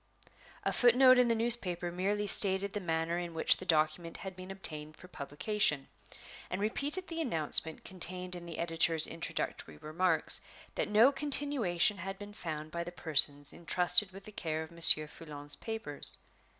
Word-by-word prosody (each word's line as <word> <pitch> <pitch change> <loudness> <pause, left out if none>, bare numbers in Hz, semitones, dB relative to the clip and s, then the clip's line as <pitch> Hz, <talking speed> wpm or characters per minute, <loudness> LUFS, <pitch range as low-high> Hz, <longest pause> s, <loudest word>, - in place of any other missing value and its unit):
A - - -1
foot 240 -1 +3
note 255 -1 +6
in 250 - +3
the 230 - +1
newspaper 200 -7 -1
merely 200 +4 -2
stated 195 0 +3
the 205 - -3
manner 165 -1 -3
in 170 -2 -7
which 160 - +3
the 185 - -11
document 160 +1 0
had 190 -1 -9
been 185 0 -11
obtained 155 -5 -5
for 180 - -15
publication, 150 -1 -1 0.6
and 185 - -4
repeated 285 - -3
the 330 -1 -5
announcement 160 - +2
contained 180 0 -1
in 175 -1 -10
the 165 - -8
editor's 165 -1 +2
introductory 80 - -5
remarks, 160 - +2 0.3
that - - -3
no 220 +6 +4
continuation 270 - 0
had 195 +2 -7
been 205 +1 -11
found 155 -6 -7
by 170 +1 -4
the 175 - -9
persons 145 -4 +2
intrusted 180 +3 +1
with 195 +1 -13
the 215 - -11
care 160 -5 -4
of 160 - -13
Monsieur 165 -2 +4
Foulon's 145 -2 -6
papers. 220 -11 +1
180 Hz, 165 wpm, -31 LUFS, 160-210 Hz, 0.6 s, note